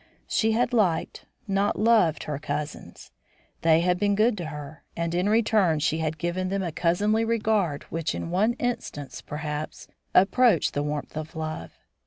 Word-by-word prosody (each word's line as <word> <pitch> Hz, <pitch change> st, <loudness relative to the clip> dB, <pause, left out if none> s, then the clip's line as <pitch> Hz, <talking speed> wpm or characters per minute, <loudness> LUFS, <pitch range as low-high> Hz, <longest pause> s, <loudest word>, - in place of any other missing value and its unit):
She 220 Hz, 0 st, +2 dB
had 240 Hz, +2 st, +1 dB
liked, 185 Hz, -8 st, +1 dB, 0.2 s
not 200 Hz, +1 st, +1 dB
loved 215 Hz, -8 st, +3 dB
her 150 Hz, -2 st, -4 dB
cousins. 150 Hz, 0 st, -6 dB, 0.5 s
They 165 Hz, 0 st, +4 dB
had 180 Hz, 0 st, +1 dB
been 205 Hz, 0 st, +2 dB
good 220 Hz, +3 st, +3 dB
to 175 Hz, -, -4 dB
her, 150 Hz, 0 st, -8 dB
and 170 Hz, 0 st, -1 dB
in 180 Hz, +3 st, +1 dB
return 210 Hz, -6 st, +3 dB
she 155 Hz, +1 st, 0 dB
had 155 Hz, -1 st, -2 dB
given 180 Hz, +2 st, -2 dB
them 195 Hz, 0 st, -1 dB
a 175 Hz, -, -2 dB
cousinly 205 Hz, +7 st, +1 dB
regard 215 Hz, -9 st, 0 dB
which 165 Hz, -1 st, -2 dB
in 170 Hz, -, -4 dB
one 210 Hz, +6 st, +2 dB
instance, 240 Hz, -, -4 dB
perhaps, 150 Hz, 0 st, -5 dB, 0.3 s
approached 205 Hz, -, +4 dB
the 145 Hz, -, 0 dB
warmth 150 Hz, +1 st, -4 dB
of 155 Hz, +2 st, -6 dB
love. 155 Hz, -, -5 dB
175 Hz, 165 wpm, -26 LUFS, 155-215 Hz, 0.5 s, They